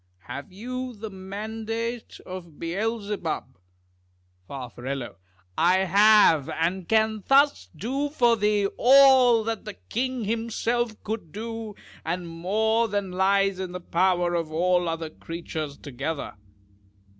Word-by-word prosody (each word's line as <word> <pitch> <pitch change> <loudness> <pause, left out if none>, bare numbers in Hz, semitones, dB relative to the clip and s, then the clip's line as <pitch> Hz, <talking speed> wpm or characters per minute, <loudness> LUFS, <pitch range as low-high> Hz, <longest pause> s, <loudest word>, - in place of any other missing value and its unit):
Have 140 - -7
you 250 +5 -5
the 215 0 -7
mandate 220 +4 -5
of 175 -4 -9
Beelzebub? 195 - -3 0.9
Far. 130 -3 -7 0.9
I 175 +3 +5
have; 190 -5 +5
and 165 +3 -2
can 220 -1 +2
thus 275 - +4
do 275 +6 -2
for 240 -5 +3
thee 210 -1 +1
all 260 -3 +7
that 225 0 -3
the 210 - -7
king 255 +1 -3
himself 230 +1 -1
could 210 -7 -5
do, 225 +1 -6 0.3
and 175 +2 -3
more 215 +7 +1
than 200 -3 -2
lies 195 +1 +2
in 185 -1 -4
the 180 - -4
power 175 0 +1
of 165 -2 -2
all 175 +1 +2
other 165 -1 -4
creatures 160 -4 -6
together. 145 +2 -5
200 Hz, 120 wpm, -25 LUFS, 170-225 Hz, 0.9 s, all